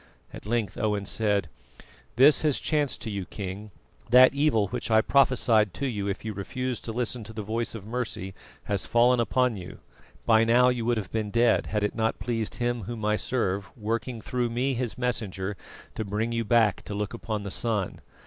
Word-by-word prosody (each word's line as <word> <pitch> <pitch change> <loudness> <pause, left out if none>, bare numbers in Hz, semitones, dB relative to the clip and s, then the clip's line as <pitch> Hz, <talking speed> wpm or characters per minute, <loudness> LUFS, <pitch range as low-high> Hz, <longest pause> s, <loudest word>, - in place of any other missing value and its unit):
At - - -10
length 115 -2 -1
Owen 105 -2 0
said: 100 -4 0 0.7
"This 140 +5 +6
has 150 -3 +2
chanced 150 -4 0
to 110 - -4
you, 100 -2 -3
King: 100 +2 -6 0.4
that 130 +2 +7
evil 140 -8 +2
which 120 +1 -4
I 110 -1 +5
prophesied 115 -7 +3
to 140 - -3
you 105 -6 -2
if 100 +2 -4
you 110 - -3
refused 125 +5 -4
to 115 - -3
listen 120 0 -2
to 110 - -10
the 110 -1 -5
voice 115 +3 -2
of 105 -3 -8
mercy 110 -5 -4 0.3
has 100 -2 -1
fallen 120 +1 +4
upon 125 -1 +1
you. 90 -1 -9 0.5
By 110 -1 +5
now 120 +2 +5
you 120 -2 -1
would 120 0 +1
have 100 -4 -5
been 110 -2 -2
dead, 115 +1 +2
had 105 -1 -1
it 105 - 0
not 110 0 0
pleased 115 0 -2
Him 120 -3 -2
Whom 110 -1 -5
I 105 0 +2
serve, 100 -6 -1
working 115 +2 -3
through 125 -1 -1
me, 125 +4 0
His 120 -2 -3
messenger, 105 -6 -2 0.4
to - - -3
bring 105 +3 -2
you 115 0 -1
back 110 -2 +3
to 100 - -5
look 105 +1 -3
upon 110 -2 -4
the 100 - -5
sun. 105 -5 -1
115 Hz, 195 wpm, -27 LUFS, 105-120 Hz, 0.7 s, that